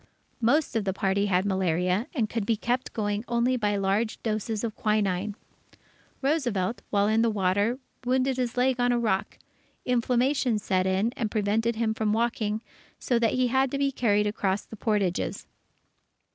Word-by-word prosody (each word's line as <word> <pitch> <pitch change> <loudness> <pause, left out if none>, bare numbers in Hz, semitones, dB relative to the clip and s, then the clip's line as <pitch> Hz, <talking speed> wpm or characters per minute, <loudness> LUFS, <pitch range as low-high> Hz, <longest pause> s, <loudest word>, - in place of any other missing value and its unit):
Most 275 +4 +2
of 225 - +1
the 190 -1 -1
party 195 +1 +1
had 185 0 +2
malaria, 185 +2 +1
and 230 -6 +1
could 225 0 -2
be 225 +2 +1
kept 245 +4 -2
going 205 -1 -2
only 240 +2 +1
by 210 -4 0
large 200 +3 0
doses 220 0 -2
of 225 -2 -3
quinine. 205 -2 0 0.9
Roosevelt, 240 - 0
while 200 -1 +2
in 220 +1 +3
the 230 - +3
water, 205 +3 +1 0.3
wounded 260 +1 +1
his 250 -1 -2
leg 250 0 +2
on 245 0 +3
a 240 - +2
rock; 215 -5 -1 0.5
inflammation 250 0 +1
set 190 -2 0
in, 195 +5 +1
and 225 -3 -2
prevented 220 +2 0
him 220 -1 0
from 220 -1 0
walking, 220 -1 -1 0.3
so 240 -2 0
that 230 -1 +2
he 255 -1 +2
had 265 +2 +2
to 275 - -2
be 275 0 +1
carried 210 -5 +2
across 205 -1 -1
the - - -10
portages. 205 -4 -1
220 Hz, 170 wpm, -27 LUFS, 205-245 Hz, 0.9 s, in